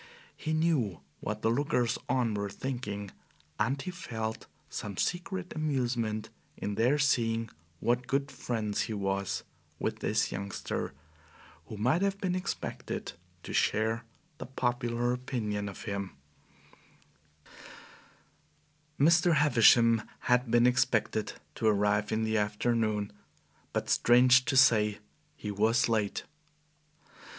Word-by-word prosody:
He 155 - -4
knew 155 - +1 0.2
what 105 +1 -4
the 110 - +3
lookers 125 -2 +1
on 120 -4 +1
were 100 -1 -2
thinking, 105 -5 -5 0.5
and 130 +6 +1
he 180 - -4
felt 115 -11 -5 0.2
some 100 -3 -6
secret 180 +1 -2
amusement 120 -8 -1 0.3
in 105 - -3
their 120 +8 +3
seeing 115 -5 +1 0.3
what 120 +1 0
good 140 0 0
friends 110 -4 -2
he - - -2
was 100 -1 -2 0.3
with - - -2
this - - 0
youngster, 100 +1 -4 0.7
who 110 - -7
might 125 - +2
have 195 0 +1
been 185 -2 -1
expected 185 +1 -4 0.3
to - - -7
share 110 +2 +1 0.4
the 125 - -6
popular 120 -1 -1
opinion 110 -5 -3
of 100 - -9
him. 100 -5 -4 2.8
Mr. 170 +3 +5
Havisham 115 -5 +5 0.2
had 125 0 +2
been 120 +1 +4
expected 125 -4 +1 0.2
to 110 - -1
arrive 105 0 +2
in 110 0 0
the 110 0 +1
afternoon, 105 0 0 0.6
but, - - -2
strange 125 +1 +5
to 130 +2 +1
say, 105 -5 +5 0.4
he 105 - -5
was 110 +4 +2
late. 110 -3 0
115 Hz, 120 wpm, -30 LUFS, 105-130 Hz, 2.8 s, Mr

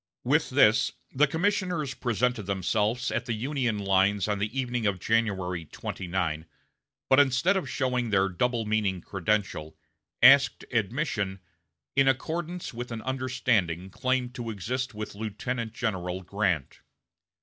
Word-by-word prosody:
With - - +2
this - - +4 0.2
the 150 +3 +3
commissioners 170 -3 0
presented 120 -3 -1
themselves 105 +5 0
at 120 - -1
the 120 - 0
Union 125 -1 -1
lines 100 0 +2
on 105 -1 -1
the 105 +6 -2
evening 120 -3 -1
of 95 -2 0
January 95 -5 0
29, 85 -1 -3 0.6
but 130 - +5
instead 145 +8 +4
of 190 - -2
showing 125 -3 0
their 95 -2 +3
double 115 +5 0
meaning 105 -4 0
credential, 95 -5 -2 0.5
asked 135 +2 +7
admission, 110 - -1 0.6
"in 135 0 +4
accordance 165 +5 -1
with 120 +1 -6
an 115 -1 -5
understanding 120 -9 0
claimed 130 +2 -1
to 120 -2 -5
exist 120 +4 -3
with 105 0 -5
Lieutenant 110 +3 -4
General 95 -6 -3
Grant." 90 -7 -1
110 Hz, 130 wpm, -27 LUFS, 95-130 Hz, 0.6 s, asked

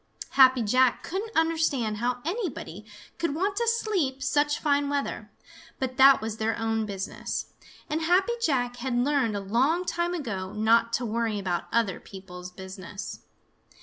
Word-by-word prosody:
Happy 260 -2 +6
Jack 255 +3 +3
couldn't 410 +5 -4
understand 320 -9 +1
how 245 +2 -2
anybody 305 - -4 0.3
could 335 -4 -1
want 390 +5 0
to 470 +2 0
sleep 375 - 0
such 295 0 +2
fine 285 -1 +1
weather, 285 -1 -3 0.5
but 255 -1 -3
that 270 0 +8
was 220 0 -4
their 220 +1 -1
own 225 -1 -1
business, 195 -1 -5 0.3
and 310 +2 -2
Happy 365 +7 +3
Jack 245 - 0
had 245 0 -2
learned 255 -4 +1
a - - -1
long 260 - +1
time 345 0 -1
ago 195 - -4
not 230 +2 +3
to 245 +1 -1
worry 225 -1 -1
about 180 -3 -2
other 225 -5 +1
people's 180 -2 -10
business. 190 +1 -8
250 Hz, 150 wpm, -27 LUFS, 215-305 Hz, 0.5 s, that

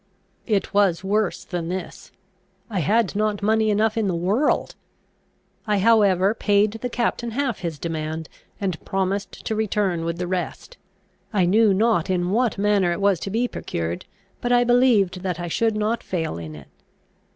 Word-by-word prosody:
It 205 -4 0
was 195 -3 +2
worse 205 0 0
than 175 -2 -4
this. 185 +1 -6 0.6
I 195 - -1
had 205 +6 +1
not 210 -1 0
money 220 +1 +2
enough 215 +1 +2
in 220 -3 0
the 180 - 0
world. 200 - +1 0.9
I 210 -1 +2
however 200 -2 +4
paid 205 -1 +2
the 250 - -2
captain 235 0 -1
half 245 0 -2
his 165 -4 -4
demand, 160 0 -4 0.3
and 185 -5 -3
promised 195 0 -3
to - - -1
return 205 -5 0
with 170 0 -2
the 180 - -2
rest. 185 - -4 0.5
I 195 -5 +2
knew 210 +4 +4
not 200 -3 +2
in 180 -1 0
what 235 +1 +1
manner 200 -3 +2
it 170 - -2
was 200 -3 +2
to 195 - -5
be 230 +5 0
procured, 85 - -4 0.4
but 245 - -1
I 245 0 +5
believed 240 -7 +3
that 180 -2 -3
I 175 - -4
should 220 +6 0
not 215 +2 0
fail 160 - -3
in 80 -2 -8
it. 70 -2 -13
200 Hz, 170 wpm, -23 LUFS, 175-220 Hz, 0.9 s, I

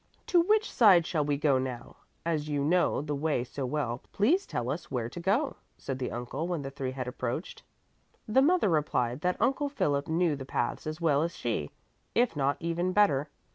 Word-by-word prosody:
"To 350 - +4
which 430 +5 +2
side 190 -8 +6
shall 155 -3 0
we 145 -1 0
go 140 -2 +3
now? 125 -2 -5 0.3
As 155 -3 -1
you 145 -1 0
know 165 -2 +2
the 150 -1 -3
way 145 -3 0
so 130 +1 -5
well, 125 -3 -2
please 320 - +2
tell 125 +1 -2
us 160 +3 -5
where 120 -3 -2
to 145 - -8
go," 205 - 0 0.2
said 135 -1 -5
the 125 - -2
uncle 125 +7 -4
when 170 -5 -2
the 135 - -5
three 135 -1 -4
had 130 -1 -4
approached. 125 +5 -4 0.7
The 225 +5 +4
mother 325 - +3
replied 145 -5 0
that 180 +1 0
Uncle 270 +5 +1
Philip 145 - 0
knew 165 -1 +1
the 135 - -7
paths 125 +1 -2
as 155 +1 -4
well 150 -4 +2
as 170 +1 -2
she, 105 -12 -2 0.5
if 240 -6 +2
not 140 -1 +1
even 175 +2 -1
better. 150 -9 +3
150 Hz, 200 wpm, -29 LUFS, 135-180 Hz, 0.7 s, side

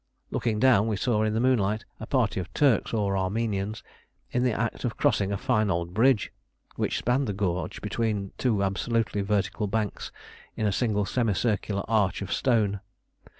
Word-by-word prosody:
Looking 115 -3 0
down, 115 -4 +5
we 110 - 0
saw 110 +1 +1
in 110 0 +1
the - - +1
moonlight 110 -3 +1
a 110 - -7
party 120 -9 +1
of 95 - -6
Turks 135 -7 +3
or 100 -3 0
Armenians 100 +2 -2 0.5
in 125 - +1
the 125 0 +2
act 115 +1 -2
of 120 - -2
crossing 100 -1 +2
a 100 - 0
fine 110 +1 +1
old 85 -1 -1
bridge 115 +1 +3 0.4
which - - -1
spanned 125 +3 +1
the 105 - -1
gorge 90 -4 -2
between 105 -4 -1
two 110 -6 +1
absolutely 105 +1 0
vertical 105 +1 0
banks 105 0 -2 0.4
in 110 - -1
a 105 - +2
single 105 -1 0
semicircular 105 -2 0
arch 105 -3 +1
of 100 - -3
stone. 110 -6 +1
105 Hz, 170 wpm, -27 LUFS, 100-115 Hz, 0.5 s, down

